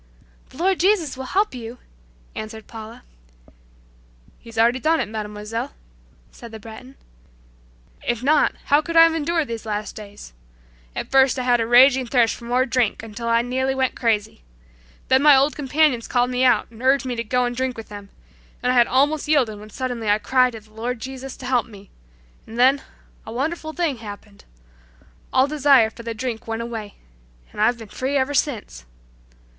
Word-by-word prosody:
"The -, -, -16 dB
Lord 375 Hz, +2 st, +1 dB
Jesus 360 Hz, -7 st, +2 dB
will 260 Hz, 0 st, -7 dB
help 400 Hz, +7 st, 0 dB
you," 240 Hz, -1 st, -8 dB, 0.6 s
answered 215 Hz, 0 st, -7 dB
Paula. 225 Hz, 0 st, -10 dB, 1.4 s
"He's 230 Hz, -1 st, -13 dB
already 235 Hz, +3 st, +3 dB
done 320 Hz, +5 st, +2 dB
it, 240 Hz, -, -1 dB
Mademoiselle," 210 Hz, +1 st, -5 dB, 0.6 s
said 235 Hz, -, -12 dB
the 220 Hz, -, -9 dB
Breton. 230 Hz, +5 st, -12 dB, 1.1 s
"If 240 Hz, 0 st, -2 dB
not, 300 Hz, +2 st, +3 dB
how 290 Hz, +2 st, +4 dB
could 335 Hz, +1 st, -3 dB
I 330 Hz, -, +10 dB
have 330 Hz, 0 st, +4 dB
endured 325 Hz, 0 st, 0 dB
these 230 Hz, -1 st, -5 dB
last 210 Hz, -1 st, -4 dB
days. 205 Hz, -, -11 dB, 0.6 s
At -, -, -5 dB
first 270 Hz, -1 st, +4 dB
I 255 Hz, -, -2 dB
had 245 Hz, -1 st, +3 dB
a 225 Hz, -, -1 dB
raging 255 Hz, +1 st, +6 dB
thirst 235 Hz, -2 st, +3 dB
for 235 Hz, -, -12 dB
more 250 Hz, +2 st, +1 dB
drink 245 Hz, -4 st, 0 dB
until 225 Hz, +1 st, -7 dB
I 230 Hz, 0 st, +3 dB
nearly 260 Hz, +2 st, -1 dB
went 260 Hz, -1 st, 0 dB
crazy. 215 Hz, -, -1 dB, 0.7 s
Then 260 Hz, +1 st, +4 dB
my 295 Hz, -1 st, +7 dB
old 275 Hz, +3 st, +3 dB
companions 285 Hz, -3 st, +1 dB
called 245 Hz, 0 st, +1 dB
me 250 Hz, +1 st, 0 dB
out 240 Hz, -3 st, +3 dB
and 225 Hz, 0 st, -14 dB
urged 265 Hz, +1 st, +3 dB
me 250 Hz, -1 st, -3 dB
to 230 Hz, -, -3 dB
go 250 Hz, +2 st, 0 dB
and 245 Hz, 0 st, -3 dB
drink 260 Hz, 0 st, -2 dB
with 225 Hz, -, -9 dB
them, 205 Hz, -1 st, -10 dB, 0.5 s
and 250 Hz, -, +2 dB
I -, -, +1 dB
had 240 Hz, -1 st, +5 dB
almost 290 Hz, +4 st, +1 dB
yielded 255 Hz, -9 st, +1 dB
when 210 Hz, +1 st, -12 dB
suddenly 245 Hz, -1 st, -4 dB
I 205 Hz, -, +4 dB
cried 255 Hz, +2 st, +2 dB
to 225 Hz, -, -8 dB
the 215 Hz, 0 st, -23 dB
Lord 235 Hz, +2 st, -4 dB
Jesus 265 Hz, +2 st, -7 dB
to 260 Hz, -, -10 dB
help 250 Hz, -2 st, +1 dB
me, 200 Hz, -3 st, -15 dB, 0.6 s
and 225 Hz, -, -9 dB
then 265 Hz, +3 st, +4 dB, 0.4 s
a 220 Hz, -, -9 dB
wonderful 315 Hz, +6 st, -3 dB
thing 315 Hz, -5 st, -1 dB
happened! 205 Hz, -2 st, -11 dB, 0.9 s
All 260 Hz, -, +4 dB
desire 280 Hz, -6 st, +4 dB
for 235 Hz, -, -11 dB
the 230 Hz, -1 st, -5 dB
drink 240 Hz, -1 st, -5 dB
went 225 Hz, 0 st, -3 dB
away, 225 Hz, -3 st, -7 dB, 0.6 s
and -, -, -5 dB
I've 235 Hz, +3 st, +3 dB
been 225 Hz, -2 st, -10 dB
free 265 Hz, +7 st, -2 dB
ever 270 Hz, +2 st, 0 dB
since! 225 Hz, -, -2 dB
245 Hz, 185 wpm, -22 LUFS, 225-270 Hz, 1.4 s, I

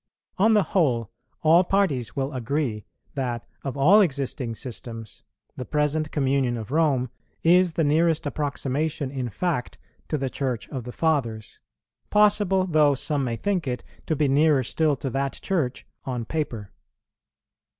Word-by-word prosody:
On 220 Hz, +3 st, +5 dB
the 210 Hz, -, +5 dB
whole, 120 Hz, -, +1 dB, 0.3 s
all 165 Hz, +3 st, +6 dB
parties 175 Hz, -, 0 dB
will 135 Hz, +1 st, -2 dB
agree 125 Hz, -3 st, -2 dB, 0.3 s
that, 125 Hz, -4 st, -3 dB, 0.2 s
of 135 Hz, 0 st, -4 dB
all 180 Hz, +10 st, +6 dB
existing 135 Hz, -, -1 dB
systems, 115 Hz, -2 st, -7 dB, 0.3 s
the 125 Hz, -, -5 dB
present 150 Hz, +2 st, 0 dB
communion 135 Hz, -4 st, +1 dB
of 110 Hz, +1 st, -7 dB
Rome 140 Hz, -6 st, +2 dB, 0.3 s
is 180 Hz, +1 st, +5 dB
the 165 Hz, -, +1 dB
nearest 160 Hz, +2 st, +2 dB
approximation 145 Hz, 0 st, -2 dB
in 130 Hz, -3 st, -3 dB
fact 155 Hz, -, -2 dB, 0.3 s
to 155 Hz, -, -1 dB
the 135 Hz, -1 st, -2 dB
Church 130 Hz, -5 st, -2 dB
of 130 Hz, -5 st, -5 dB
the 125 Hz, -, -6 dB
Fathers, 120 Hz, -9 st, -1 dB, 0.5 s
possible 205 Hz, -3 st, +3 dB
though 150 Hz, -5 st, +4 dB
some 145 Hz, +1 st, -1 dB
may 120 Hz, -3 st, -1 dB
think 180 Hz, -, -1 dB
it, 125 Hz, -1 st, -3 dB, 0.2 s
to 160 Hz, -, +1 dB
be 150 Hz, 0 st, +2 dB
nearer 145 Hz, 0 st, +4 dB
still 150 Hz, +4 st, +1 dB
to 135 Hz, +1 st, -4 dB
that 135 Hz, +1 st, -1 dB
Church 155 Hz, -10 st, -2 dB, 0.2 s
on 125 Hz, -3 st, -3 dB
paper. 120 Hz, -9 st, -4 dB
140 Hz, 150 wpm, -25 LUFS, 125-160 Hz, 0.5 s, all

